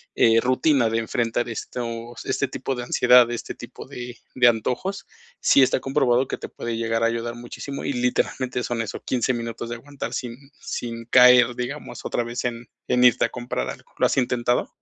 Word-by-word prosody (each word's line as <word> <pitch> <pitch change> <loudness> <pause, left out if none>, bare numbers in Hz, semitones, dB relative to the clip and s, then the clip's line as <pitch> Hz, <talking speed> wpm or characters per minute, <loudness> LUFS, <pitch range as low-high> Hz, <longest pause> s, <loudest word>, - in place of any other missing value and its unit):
eh, 115 0 +5
rutina 130 0 +2
de 115 0 0
enfrentar 115 +1 -1
estos 115 +1 -6
este 130 +1 0
tipo 135 +1 -3
de 125 - -4
ansiedad, 125 0 +5
este 120 - -5
tipo - - -10
de 125 -1 -8 0.2
de 125 -1 +5
antojos, 125 - 0 0.3
sí 140 - +5
está 130 - +2
comprobado 130 -1 +1
que - - -4
te - - -8
puede 115 -1 -5
llegar 115 0 0
a - - +5
ayudar 115 0 -3
muchísimo 120 +3 -7
y - - -1
literalmente 125 0 -1
son 120 0 -2
eso, 115 0 -5
15 125 0 0
minutos 115 0 -5
de 120 - -4
aguantar 125 -1 -7
sin 120 -2 -4 0.2
sin 115 -1 -5
caer, 125 0 +6
digamos, 125 0 -6
otra 120 - -1
vez 120 +1 -4
en 120 -1 -4 0.2
en 125 0 +2
irte 125 - +5
a - - -3
comprar 120 - -4
algo. - - -10
¿Lo - - +3
has - - +1
intentado? 125 -1 +1
120 Hz, 190 wpm, -23 LUFS, 115-125 Hz, 0.3 s, caer